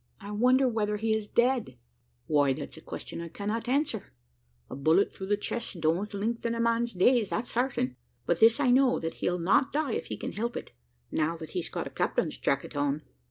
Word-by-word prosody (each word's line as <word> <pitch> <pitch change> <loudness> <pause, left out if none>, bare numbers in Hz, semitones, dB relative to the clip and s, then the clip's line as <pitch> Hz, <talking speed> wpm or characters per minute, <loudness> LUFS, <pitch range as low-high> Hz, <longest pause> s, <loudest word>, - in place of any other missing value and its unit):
"I 205 -1 -8
wonder 255 +5 +4
whether 210 -3 0
he 220 +1 +1
is 220 -1 -1
dead?" 245 - +1 0.5
"Why, 145 -2 +3
that's 70 - -7
a - - -11
question - - -7
I 170 - -5
cannot 210 +7 -3
answer: 270 -6 -1 0.5
a - - -7
bullet 160 +8 +3
through 190 - -7
the 205 +1 +2
chest 210 -3 -4
don't 165 +6 +1
lengthen 230 +3 -2
a - - -3
man's 230 0 +1
days, 220 +3 +3
that's 235 +3 -2
certain; 235 - 0 0.3
but 170 -1 +1
this 230 +2 +6
I 260 -4 +3
know, 255 0 +4
that 165 0 -3
he'll 180 - +1
not 190 +10 +3
die 295 -5 0
if - - -3
he - - -4
can - - -4
help 235 +3 -3
it, - - -7 0.4
now 160 +2 0
that 160 -1 -9
he's 180 -3 -2
got - - -3
the - - -8
captain's - - -1
jacket 140 +2 -1
on." 145 +1 0
210 Hz, 205 wpm, -29 LUFS, 170-235 Hz, 0.5 s, this